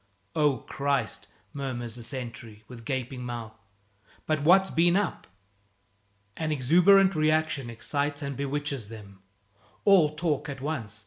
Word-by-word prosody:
"Oh, 150 -3 +3
Christ!" 140 +4 -2 0.3
murmurs 125 -4 -4
the 120 - -5
sentry, 115 -4 -6
with 120 -2 -11
gaping 130 -1 -3
mouth, 120 -3 -6 0.7
"but 155 -1 0
what's 190 +5 +5
been 175 +2 +3
up?" 200 -3 -1 1.1
An 160 -1 -2
exuberant 180 +8 +5
reaction 155 -4 +1
excites 145 +5 -2
and 140 -1 -4
bewitches 140 -3 -3
them. 100 -3 -12 0.6
All 170 -7 +5
talk 150 -2 -1
at 140 -1 -6
once. 130 -8 -4
140 Hz, 125 wpm, -27 LUFS, 120-155 Hz, 1.1 s, what's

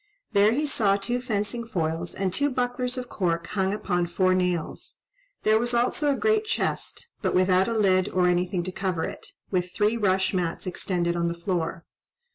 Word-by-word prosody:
There 205 +2 +5
he 290 +6 +1
saw 215 -8 +2
two 240 +5 -2
fencing 225 0 -2
foils, 165 -4 -2
and 190 -2 -1
two 285 +8 +2
bucklers 250 0 -1
of 250 -1 -4
cork 170 -6 -1
hung 190 +1 -1
upon 180 -4 -1
four 185 +2 +2
nails; 180 -3 -2 0.5
there 215 0 +4
was 240 +1 0
also 255 +5 +2
a - - +1
great 435 0 +2
chest, 430 - -2
but - - 0
without 185 +1 +4
a 230 -1 -1
lid 185 -3 +3
or 185 -1 +2
anything 180 0 +1
to 185 - -4
cover 185 -3 -2
it, - - -6 0.2
with 180 -2 0
three 215 +2 +2
rush 190 -3 +1
mats 175 -3 -1
extended 175 -1 -1
on 170 0 0
the 170 0 -3
floor. 170 -1 -2
190 Hz, 185 wpm, -26 LUFS, 180-230 Hz, 0.5 s, There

